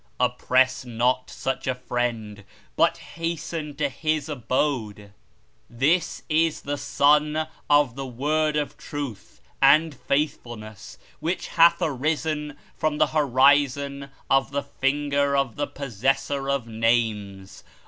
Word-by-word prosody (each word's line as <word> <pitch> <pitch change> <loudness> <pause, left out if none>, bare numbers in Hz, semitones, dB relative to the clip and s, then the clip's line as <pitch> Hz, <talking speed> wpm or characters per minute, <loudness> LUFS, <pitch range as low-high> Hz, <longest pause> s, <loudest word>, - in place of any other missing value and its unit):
Oppress 130 +1 +2
not 125 +1 0
such 135 0 -4
a 130 - +1
Friend, 120 -5 -3 0.3
but - - +3
hasten 165 -2 -5
to 145 0 0
His 155 +1 -2
Abode. 120 -6 -2 0.6
This 150 +8 0
is 160 0 +1
the 145 +1 -3
Sun 150 +2 +2 0.2
of 145 -4 +4
the 135 +1 -6
Word 150 +5 0
of 150 -1 -2
Truth 140 -8 -7 0.2
and 150 +3 +5
Faithfulness 120 -7 -4 0.2
which 170 +4 -3
hath 170 0 +5
arisen 150 +1 -1 0.2
from 155 -1 -1
the - - +4
Horizon 140 0 +2 0.2
of 135 -1 +2
the 140 0 -2
Finger 140 0 0
of 135 -5 0
the 145 0 -2
Possessor 135 +2 -1
of 140 -4 0
Names. 110 -4 -1
140 Hz, 115 wpm, -24 LUFS, 125-150 Hz, 0.6 s, and